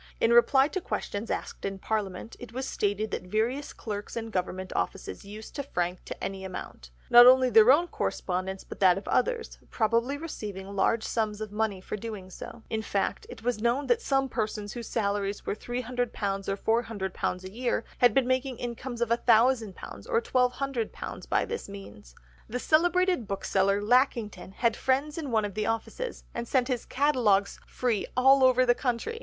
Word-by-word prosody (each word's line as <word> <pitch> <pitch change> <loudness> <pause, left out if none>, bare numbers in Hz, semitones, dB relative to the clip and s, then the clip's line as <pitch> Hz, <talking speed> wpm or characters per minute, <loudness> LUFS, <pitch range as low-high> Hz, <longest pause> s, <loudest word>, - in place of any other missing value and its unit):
In 230 - +3
reply 265 +3 +6
to 375 - -3
questions 210 -8 -4
asked - - -4
in 195 0 -3
Parliament, 205 0 -3
it 245 - -9
was 260 +3 -4
stated 205 +1 -1
that - - -2
various 230 +8 -1
clerks 210 0 -6
in 225 -1 -4
Government 185 -1 -3
offices - - -3
used 210 +2 -9
to 285 - -2
frank 180 -9 -3
to - - -7
any 195 -1 -4
amount—not 185 - +3
only 255 0 +6
their 220 +2 +8
own 335 +6 +4
correspondence 190 - -3
but - - -10
that 185 -2 +5
of 195 - -7
others; 485 -2 0
probably 235 +5 +1
receiving 200 - -6
large 220 +3 +2
sums 215 -2 -1
of 215 -2 -5
money 210 -2 -1
for 190 - -5
doing 205 -4 -7
so. 230 +5 -9
In 220 -1 -2
fact 200 -2 -2
it 220 - -10
was 240 -3 -1
known 240 +5 +1
that 475 -1 +2
some 270 -6 +1
persons 215 -4 -3
whose 235 -2 -7
salaries 200 -2 -1
were - - -1
£300 225 -5 -3
or 225 +1 +3
£400 190 -3 -3
a 185 - -8
year 240 +1 -1 0.2
had 245 -3 +5
been 270 - +4
making 255 0 0
incomes 240 0 -5
of 235 - +1
£1000 235 +1 +4
and 205 -4 -9
£1200 260 - -2
by - - +2
this 465 - -5
means! 195 - -11 0.3
The 245 - -2
celebrated 350 - +2
bookseller 195 0 +1
Lackington 220 -5 +1
had 230 +2 +1
friends 285 +4 0
in 295 -4 -4
one 220 -3 +2
of 205 - -5
the 215 +2 -2
offices, 225 - -3
and 235 0 -4
sent 255 0 +1
his 250 -3 -1
catalogues 245 -8 +2
free 240 -5 -1
all 265 +1 +6
over 255 0 +5
the 245 - +5
country. 255 - -2
230 Hz, 175 wpm, -28 LUFS, 200-255 Hz, 0.3 s, their